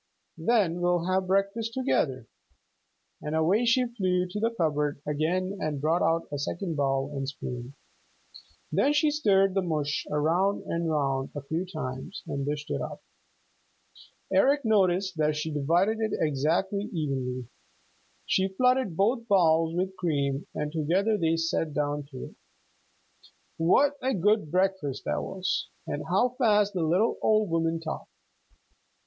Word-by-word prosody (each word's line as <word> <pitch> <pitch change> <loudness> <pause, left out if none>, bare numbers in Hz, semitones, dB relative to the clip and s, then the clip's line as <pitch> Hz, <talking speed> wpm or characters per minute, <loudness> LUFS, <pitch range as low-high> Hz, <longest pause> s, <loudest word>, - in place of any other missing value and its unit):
Then 185 -2 +2
we'll 180 +1 +2
breakfast 200 +4 0
together," 135 - 0 1.0
and 150 +1 -3
away 185 +9 +2
she 250 +2 +3
flew 185 -6 0
to 210 - -4
the 225 +2 +2
cupboard 150 -9 -1
again 180 +6 -1
and 150 -2 -2
brought 160 +5 +1
out 165 0 +1
a 145 - -3
second 170 +4 -3
bowl 135 -1 0
and 135 -1 -2
spoon. 125 -1 -7 1.0
Then 290 - +3
she 295 +1 +3
stirred 195 -10 +3
the 195 - +1
mush 150 -4 -2
round 165 +7 +1
and 170 0 -2
round 135 -3 0
a 145 - -5
few 165 +6 -3
times 130 -4 -6
and 140 0 -3
dished 145 0 -3
it - - -1
up. - - -6 1.3
Eric 280 0 +3
noticed 190 -4 +2
that 150 -1 +1
she 155 +1 -3
divided 175 +10 +2
it 220 -1 -1
exactly 165 +8 0
evenly. 130 - -3 0.8
She 190 0 +2
flooded 250 -2 +1
both 230 +4 +1
bowls 165 -5 +3
with 185 +2 -1
cream, 140 -5 -1
and 150 0 -2
together 175 +8 +1
they 165 -4 +1
sat 165 -2 -1
down 145 -1 -1
to 130 -3 -8
it. - - -13 1.2
What 280 - +3
a 260 -1 0
good 205 -2 +2
breakfast 185 -6 0
that 75 0 -1
was, 185 - -2 0.2
and - - -4
how 250 - +3
fast 210 -4 +3
the 180 - -1
little 180 +8 +2
old 215 -4 +2
woman 165 0 +1
talked! 160 -1 -6
170 Hz, 145 wpm, -27 LUFS, 150-200 Hz, 1.3 s, she